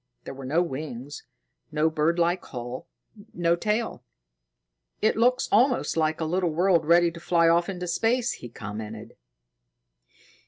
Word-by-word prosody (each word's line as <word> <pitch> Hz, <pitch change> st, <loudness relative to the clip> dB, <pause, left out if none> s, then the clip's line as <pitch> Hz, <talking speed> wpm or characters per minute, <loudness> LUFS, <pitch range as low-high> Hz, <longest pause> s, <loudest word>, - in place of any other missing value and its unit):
There -, -, -7 dB
were 135 Hz, 0 st, -9 dB
no 165 Hz, +6 st, +2 dB
wings, 145 Hz, -3 st, -7 dB, 0.5 s
no 155 Hz, +1 st, +2 dB
birdlike 170 Hz, +3 st, +1 dB
hull, 125 Hz, 0 st, -7 dB, 0.5 s
no 170 Hz, -1 st, +2 dB
tail. 210 Hz, -, -2 dB, 1.0 s
"It -, -, +2 dB
looks 250 Hz, +3 st, +2 dB
almost 245 Hz, +4 st, +3 dB
like 155 Hz, -1 st, 0 dB
a 160 Hz, -, -1 dB
little 175 Hz, +2 st, 0 dB
world 170 Hz, 0 st, +2 dB
ready 170 Hz, 0 st, +5 dB
to 170 Hz, -, -10 dB
fly 170 Hz, 0 st, +2 dB
off 170 Hz, +2 st, +3 dB
into 180 Hz, -2 st, -4 dB
space," 230 Hz, +7 st, +1 dB
he 120 Hz, -, -8 dB
commented. 105 Hz, -1 st, -8 dB
170 Hz, 140 wpm, -26 LUFS, 150-180 Hz, 1.0 s, ready